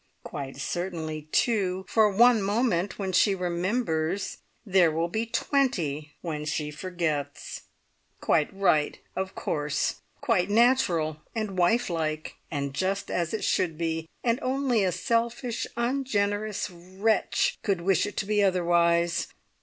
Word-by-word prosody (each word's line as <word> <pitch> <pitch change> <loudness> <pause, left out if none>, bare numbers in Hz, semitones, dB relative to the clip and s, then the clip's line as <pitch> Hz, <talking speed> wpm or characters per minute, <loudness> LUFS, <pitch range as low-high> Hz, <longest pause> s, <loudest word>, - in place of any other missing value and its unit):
Quite 135 -1 -6
certainly, 160 -1 -4
too, 190 -5 +1
for 220 +1 +4
one 230 +2 +5
moment 200 -2 0
when 195 -2 -2
she 195 +2 +4
remembers, 180 -1 -1 0.3
there 185 -5 +4
will 165 +2 -1
be 220 +5 -2
twenty 175 - 0
when 155 -3 -4
she 150 0 -2
forgets. 155 -3 -3 0.6
Quite 155 -3 +2
right, 175 -7 +2 0.2
of 190 0 -3
course! 150 -1 -1 0.2
Quite 225 -9 +1
natural, 210 - +3 0.2
and 215 -4 -2
wife 225 +8 +3
like, 155 -3 -3
and 140 -3 -3
just 190 +6 -1
as 170 -2 -1
it 220 - -3
should 165 -4 +1
be, 165 -1 -2
and 235 +1 +2
only 255 -4 +1
a 185 - +2
selfish, 230 +5 -1
ungenerous 215 -5 0
wretch 190 +5 0
could 195 -5 0
wish 195 +3 +2
it 205 - -8
to - - 0
be 210 0 +2
otherwise. 170 -2 +2
185 Hz, 130 wpm, -27 LUFS, 165-215 Hz, 0.6 s, one